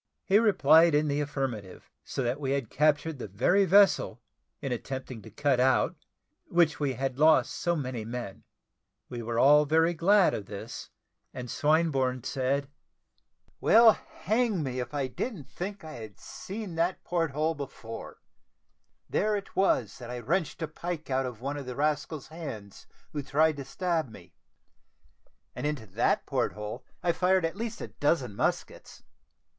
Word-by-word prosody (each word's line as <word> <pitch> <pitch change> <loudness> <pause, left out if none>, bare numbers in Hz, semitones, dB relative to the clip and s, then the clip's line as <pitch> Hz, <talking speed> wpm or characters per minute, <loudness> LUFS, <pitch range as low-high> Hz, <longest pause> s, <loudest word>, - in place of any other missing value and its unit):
He 200 +2 +5
replied 165 -7 +5
in 150 0 +2
the 145 +1 0
affirmative; 135 -9 -4
so 135 - -3
that 125 +4 -1
we 135 -2 -1
had 140 -5 -2
captured 150 0 +1
the - - -5
very 130 - +3
vessel, 195 - +4 0.4
in 135 -3 -4
attempting 130 -1 -5
to - - -12
cut 145 -3 +1
out 130 +1 +3 0.5
which 170 -3 +2
we 140 -3 0
had 135 0 -3
lost 155 +1 +5
so 175 -1 -1
many 130 -6 -3
men. 115 -3 -6 0.7
We 120 - -5
were 115 0 -3
all 150 +4 +6
very 160 +3 +3
glad 190 +4 +4
of 100 -2 -5
this, 105 +3 -8 0.5
and 125 -1 -6
Swinburne 140 -5 +1
said, 135 +1 -1 0.9
"Well, 225 0 +7
hang 215 -3 -1
me, 130 -2 -3
if 125 -1 -4
I 145 -2 -1
didn't 150 - -4
think 195 +6 -6
that 160 - -10
I - - -8
had 110 -2 -10
seen 200 -2 -7
that 170 +3 0
port 170 -2 0
hole 155 +4 0
before; 130 -6 -8 0.8
there 215 0 +1
it 200 -1 -6
was 125 - +1
that 120 -2 -8
I 125 - -4
wrenched 165 - -1
a - - -1
pike 160 -1 -6
out 130 0 +1
of 120 -3 -8
one 140 +3 -3
of 140 -3 -7
the 125 - -5
rascal's 150 +1 -1
hands, 125 - -8 0.3
who 150 - -2
tried 150 +3 +2
to 140 - -6
stab 160 +1 -1
me, 110 - -14 1.2
and - - -2
into 145 -7 -3
that 105 +4 0
port 130 -4 -1
hole 105 0 -6 0.2
I 175 - +3
fired 180 +1 +2
at 165 - -3
least 230 +2 -5
a - - -5
dozen 135 -8 0
muskets. - - -3
145 Hz, 165 wpm, -28 LUFS, 125-170 Hz, 1.2 s, Well